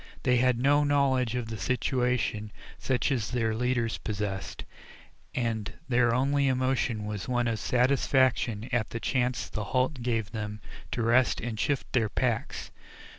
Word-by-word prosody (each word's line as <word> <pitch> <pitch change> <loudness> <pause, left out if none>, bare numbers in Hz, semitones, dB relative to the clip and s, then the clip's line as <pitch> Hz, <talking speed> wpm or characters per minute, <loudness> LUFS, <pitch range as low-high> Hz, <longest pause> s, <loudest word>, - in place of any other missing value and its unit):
They 125 0 +3
had 125 0 +3
no 145 +4 +4
knowledge 135 -4 +2
of 120 -2 -3
the 110 -2 -5
situation 125 -3 0 0.3
such 130 +1 0
as 120 -7 0
their 115 -3 0
leaders 115 -3 0
possessed, 100 -1 -4 0.7
and 115 -4 -1 0.2
their 120 -2 +3
only 140 +3 +2
emotion 130 -4 0
was 105 -2 -4
one 120 -1 +1
of 115 -2 -1
satisfaction 125 -2 +2
at 120 -3 0
the 115 - -4
chance 125 0 0
the 105 - -4
halt 130 +4 0
gave 115 -3 -1
them 105 -2 -5 0.3
to 120 - -1
rest 120 +3 +3
and 115 -1 -4
to 110 - -1
shift 145 -3 -2
their 115 -4 +2
packs. 120 +1 -2
120 Hz, 155 wpm, -28 LUFS, 110-130 Hz, 0.7 s, no